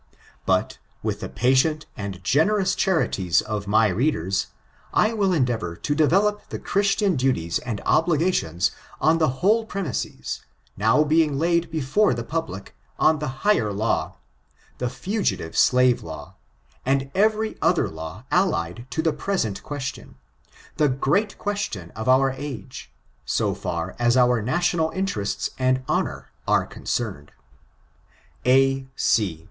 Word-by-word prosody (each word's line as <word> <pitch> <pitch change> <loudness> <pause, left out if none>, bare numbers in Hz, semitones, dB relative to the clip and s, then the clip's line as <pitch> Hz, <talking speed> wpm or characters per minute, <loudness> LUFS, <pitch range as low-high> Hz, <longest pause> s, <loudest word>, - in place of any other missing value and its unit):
But, - - +1 0.2
with - - -2
the - - -5
patient 135 - +2
and 100 -3 -6
generotis 190 - +2
charities 95 - +1
of 105 -2 -3
my 110 +2 +4
readers, 100 - 0 0.5
I 215 +2 +3
will 200 -4 +1
endeavor 120 - 0
to 145 - -2
develop 195 +8 +2
the - - -4
Christian 200 -1 +1
duties 125 - 0
and 115 -5 -5
obligations 160 - +2 0.3
on 160 +3 +3
the 155 -2 +3
whole 220 +4 +4
premises, 195 - -4 0.3
now 110 +9 +3
being 155 -2 +2
laid 170 +2 +1
before 160 +7 +1
the 120 - -4
public, 150 - -5 0.2
on 155 -1 +3
the 135 +2 -6
higher 205 - +3
law, 105 +3 -1 0.6
the 125 - -1
Fugitive 130 - -2
Slave 125 -1 +4
Law, - - -9 0.5
and 135 +1 0
every 215 +2 +1
other 170 +1 +3
law 80 +8 -8
allied 120 - 0
to 140 +6 -2
the 160 - +2
present 110 - -2
question^ 140 +2 -6 0.6
the 150 -2 +3
great 150 +11 0
quebtion 200 - -3
of 110 +3 -6
the 130 +1 +4
age, 140 -3 -7 0.3
so - - 0
far 85 -3 -4
as 120 +1 +3
our 125 -2 +4
national 160 +6 +1
interests 190 - -2
and 130 0 +2
honor - - -2 0.2
are - - +3
concerned. 95 -12 -4 1.2
A. 135 +1 +3
135 Hz, 130 wpm, -24 LUFS, 110-175 Hz, 1.2 s, my